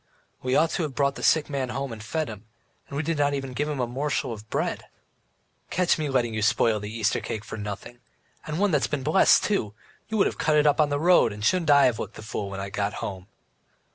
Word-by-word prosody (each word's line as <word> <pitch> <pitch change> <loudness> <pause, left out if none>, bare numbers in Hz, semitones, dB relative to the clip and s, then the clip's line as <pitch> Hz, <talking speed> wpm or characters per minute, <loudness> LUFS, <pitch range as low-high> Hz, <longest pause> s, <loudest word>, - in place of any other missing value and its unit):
We 130 0 0
ought 165 0 +3
to - - -1
have 150 -5 -3
brought 140 -1 +2
the - - -9
sick 155 -2 +3
man 135 -3 -2
home 135 -1 -3
and 110 - -9
fed 155 +7 -2
him, 110 0 -9 0.4
and 140 - -6
we 150 - 0
did 160 -1 -1
not 145 0 +2
even 135 -2 -5
give 150 +4 -1
him 145 -3 -3
a 125 - +1
morsel 130 0 -2
of 110 0 -11
bread." - - -2 0.8
"Catch 180 -2 +2
me 150 -2 -1
letting 120 -4 +1
you 110 - -2
spoil 110 0 +2
the 105 +1 -6
Easter 110 -1 0
cake 110 -1 -5
for 115 - -7
nothing! 105 +3 -7 0.5
And 155 0 -3
one 205 +1 +2
that 150 -4 +2
has - - +1
been 145 -3 -3
blessed 160 +5 +5
too! 185 - -1 0.3
You 220 - -1
would 195 - +4
have - - -2
cut 155 -1 +2
it 150 - +4
on 150 0 +4
the 145 0 0
road, 175 -7 +5
and 105 +1 -5
shouldn't 175 +2 +2
I 140 -1 +7
have 120 -4 +1
looked 110 - -6
a - - -9
fool 105 -2 -4
when 95 0 -6
I 100 0 -5
got 100 0 -1
home?" 95 -1 -6
135 Hz, 255 wpm, -26 LUFS, 110-150 Hz, 0.8 s, I